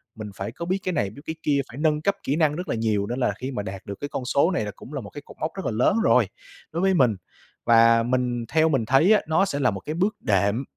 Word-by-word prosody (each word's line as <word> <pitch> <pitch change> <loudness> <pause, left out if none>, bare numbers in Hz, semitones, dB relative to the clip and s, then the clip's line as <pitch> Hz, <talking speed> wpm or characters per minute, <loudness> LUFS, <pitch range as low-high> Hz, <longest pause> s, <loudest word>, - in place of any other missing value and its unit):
mình 110 -2 -7
phải 100 +4 -5
có 170 - -7
biết 185 +2 0
cái 185 - -1
này 100 -11 0
biết 110 +8 -13
cái 160 - -4
kia, 140 -2 +2
phải 120 - -11
nâng 150 0 +1
cấp 200 +5 +1
kỹ 140 - 0
năng 155 -2 +2
rất 180 +2 -5
là - - 0
nhiều, 110 -3 0
nên 120 +3 -3
là 125 - +1
khi 130 +2 -4
mà 105 -6 -3
đạt 95 -1 -7
được 100 - -6
cái 145 - -4
con 130 - -4
số 140 +8 +2
này 110 - -1
là 105 - -4
cũng 140 - -12
là 140 - -3
một 100 - -10
cái 145 - -9
cột - - -14
mốc 155 - -2
rất 190 - -6
là - - 0
lớn 120 - +2
rồi, 125 - +4 0.4
đối 170 - -2
với 190 0 +3
mình. 125 - +3 0.5
Và 115 0 +5
mình 125 -1 -1
theo 160 +3 +3
mình 135 -7 +1
thấy 135 - +5
á, 210 - +4
nó 160 +5 +3
sẽ 145 -7 -3
là 125 -4 +2
một 95 - -5
cái 155 - -5
bước 195 +5 0
đệm 100 +3 +1
130 Hz, 300 wpm, -24 LUFS, 115-160 Hz, 0.5 s, Và